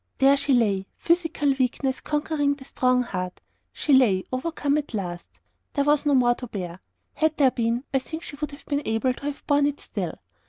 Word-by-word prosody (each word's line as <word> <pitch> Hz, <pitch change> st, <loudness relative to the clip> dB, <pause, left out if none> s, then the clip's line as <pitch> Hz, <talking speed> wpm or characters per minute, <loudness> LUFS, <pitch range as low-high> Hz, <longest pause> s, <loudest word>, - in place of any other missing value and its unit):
There 270 Hz, +1 st, +6 dB
she 280 Hz, -1 st, +2 dB
lay; 200 Hz, -5 st, +1 dB
physical 325 Hz, -4 st, +1 dB
weakness 260 Hz, +1 st, 0 dB
conquering 295 Hz, -1 st, 0 dB
the 270 Hz, -2 st, -13 dB
strong 255 Hz, -1 st, +2 dB
heart: 185 Hz, -6 st, -4 dB, 0.3 s
she 295 Hz, -, 0 dB
lay, 215 Hz, -8 st, +5 dB
overcome 290 Hz, +1 st, 0 dB
at 285 Hz, -5 st, -6 dB
last. 175 Hz, -4 st, -4 dB, 0.5 s
There 280 Hz, -, +2 dB
was 295 Hz, +1 st, +2 dB
no 285 Hz, -, +4 dB
more 245 Hz, -2 st, +5 dB
to 250 Hz, +1 st, -8 dB
bear. 180 Hz, -5 st, -6 dB, 0.3 s
Had 315 Hz, -1 st, +1 dB
there 270 Hz, -3 st, +5 dB
been, 235 Hz, +1 st, 0 dB
I 270 Hz, -, +4 dB
think 320 Hz, +5 st, -7 dB
she -, -, -7 dB
would 300 Hz, +1 st, -3 dB
have 285 Hz, -, -13 dB
been 285 Hz, 0 st, -1 dB
able 225 Hz, +3 st, +1 dB
to 280 Hz, -, -10 dB
have 290 Hz, -, -5 dB
borne 285 Hz, -1 st, +3 dB
it 290 Hz, 0 st, -3 dB
still. -, -, -4 dB
270 Hz, 200 wpm, -25 LUFS, 240-290 Hz, 0.5 s, There